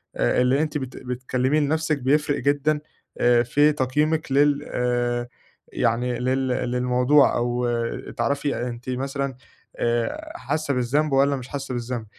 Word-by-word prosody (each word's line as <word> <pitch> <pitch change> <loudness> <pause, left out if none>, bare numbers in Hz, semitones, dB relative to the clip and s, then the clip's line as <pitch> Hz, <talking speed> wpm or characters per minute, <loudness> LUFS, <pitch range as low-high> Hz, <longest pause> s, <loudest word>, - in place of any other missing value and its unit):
آآ - - +2
اللي 130 +4 +3
أنتِ 155 -1 -1
بت 130 -1 -7
بتكلّميه 130 +3 -1
لنفْسِك 155 0 0
بيفرِق 145 +2 +1
جدًا، 145 +1 +1 0.4
آآ 120 0 +4
في 145 +5 +3
تقييمِك 150 +3 0
لل 145 +1 +2
آآ 120 0 0 0.5
يعني 120 0 0
لل 130 +1 0
للموضوع، 125 +3 +2
أو 120 +1 0 0.5
تعرفي 140 +4 0
أنتِ 120 +1 -7
مثلًا 135 +1 -2 0.4
آآ 120 -1 -1
حاسّة 140 +3 -2
بالذنب 140 +5 +1
والّا 140 +1 +3
مش 130 -1 -7
حاسّة 135 -2 -5
بالذنب، 120 -1 -4
130 Hz, 135 wpm, -24 LUFS, 125-145 Hz, 0.5 s, آآ